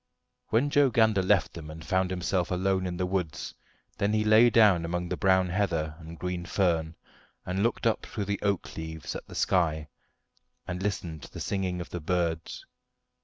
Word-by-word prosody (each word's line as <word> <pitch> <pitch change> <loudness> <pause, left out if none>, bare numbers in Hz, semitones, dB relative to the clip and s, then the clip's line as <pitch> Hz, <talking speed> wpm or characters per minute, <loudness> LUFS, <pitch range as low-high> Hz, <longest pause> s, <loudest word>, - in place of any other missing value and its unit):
When 125 +6 +1
Joe 145 -2 +5
Gander 110 -4 +3
left 95 0 +2
them 80 -2 -8
and 80 0 -9
found 95 -1 +1
himself 90 -1 -1
alone 95 +1 0
in 90 -1 -4
the 90 - 0
woods, 90 -4 -3 0.5
then 100 +1 +1
he 110 0 +2
lay 110 +3 +6
down 105 -7 +5
among 90 +1 -2
the - - -1
brown 95 -1 +3
heather 85 -5 -1
and 80 0 -10
green 90 0 -3
fern, 85 -4 0 0.5
and 90 +2 -1
looked 115 +2 0
up 115 - +1
through 105 - -4
the 100 0 -2
oak 100 -3 -1
leaves 80 -1 -6
at - - -7
the - - -11
sky, 80 -5 +1 0.8
and 90 0 -4
listened 90 -6 -3
to - - -11
the - - -8
singing 95 -3 -2
of 85 - -9
the 90 - -4
birds. 85 -1 -2
90 Hz, 185 wpm, -28 LUFS, 85-100 Hz, 0.8 s, lay